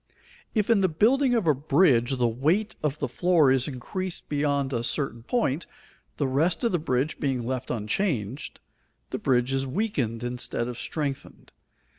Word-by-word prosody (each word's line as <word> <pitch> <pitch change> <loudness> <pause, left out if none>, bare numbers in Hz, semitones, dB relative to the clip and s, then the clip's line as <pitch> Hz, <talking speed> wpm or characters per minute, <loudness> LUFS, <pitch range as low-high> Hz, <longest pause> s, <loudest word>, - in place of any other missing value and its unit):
If 215 +1 +2
in 225 - +5
the 190 - +3
building 245 - +3
of 225 -6 +1
a 155 - +5
bridge 135 -3 +3
the 120 -1 +2
weight 155 - +1
of 150 -1 -1
the - - -2
floor 170 -6 +3
is 130 -1 +2
increased 170 +7 -5
beyond 145 -2 0
a 120 -1 -1
certain 120 -2 -1
point, 165 - -1 0.5
the 145 - 0
rest 160 - +1
of 235 - +2
the 175 - +1
bridge 140 -1 -1
being 130 -4 -1
left 130 +1 -3
unchanged, 120 - -2 0.5
the - - -3
bridge 125 0 +1
is 135 0 0
weakened 130 - -2
instead 120 -1 -2
of 125 -1 -6
strengthened. 140 -2 -4
140 Hz, 165 wpm, -26 LUFS, 125-175 Hz, 0.5 s, in